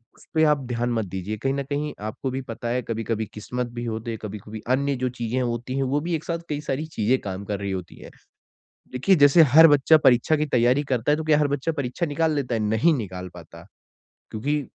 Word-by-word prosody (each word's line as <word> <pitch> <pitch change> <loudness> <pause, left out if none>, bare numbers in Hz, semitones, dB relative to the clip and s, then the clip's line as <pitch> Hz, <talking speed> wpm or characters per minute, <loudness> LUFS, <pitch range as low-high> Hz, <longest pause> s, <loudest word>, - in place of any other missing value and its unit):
उस - - -20
पे 160 - +4
आप 150 -1 +3
ध्यान 120 0 -1
मत 110 -2 -1
दीजिए। 95 +3 -5
कहीं 135 +5 -1
न 140 0 -2
कहीं 145 +2 -3
आपको 110 +5 -4
भी 130 +1 -3
पता 115 +1 -6
है 125 +1 0
कभी-कभी 115 -1 -3
किस्मत 125 +3 -4
भी 120 - -3
होते 115 0 -4
हैं, 110 - -5
कभी-कभी 105 +1 -7
अन्य 140 +2 +1
जो 130 - +1
चीज़ें 120 +1 -3
होती 120 +1 -3
हैं, 135 - +1
वो 135 +2 0
भी 170 +2 -1
एक 160 - -5
साथ 170 -1 -3
कई 150 -1 -2
सारी 150 +1 -3
चीज़ें 120 +5 +2
काम 95 0 -6
कर 100 -1 -3
रही 100 -1 -3
होती 90 -2 -6
हैं। - - -11 0.8
देखिए 135 +10 +3
जैसे 145 +2 +7
हर 160 +1 +10
बच्चा 145 +2 +5
परीक्षा 130 +4 +4
की 150 0 -1
तैयारी 125 +1 +2
करता 125 +3 +1
है - - +3
तो 160 - -4
क्या 155 -1 +4
हर 150 -1 +2
बच्चा 145 +3 -1
परीक्षा 140 +2 -3
निकाल 160 +2 0
लेता 135 -4 -2
है? 115 - 0
नहीं 110 +10 +3
निकाल 95 -7 -5
पाता। 85 -1 -12 0.7
क्योंकि 145 +6 -2
125 Hz, 230 wpm, -24 LUFS, 110-145 Hz, 0.8 s, हर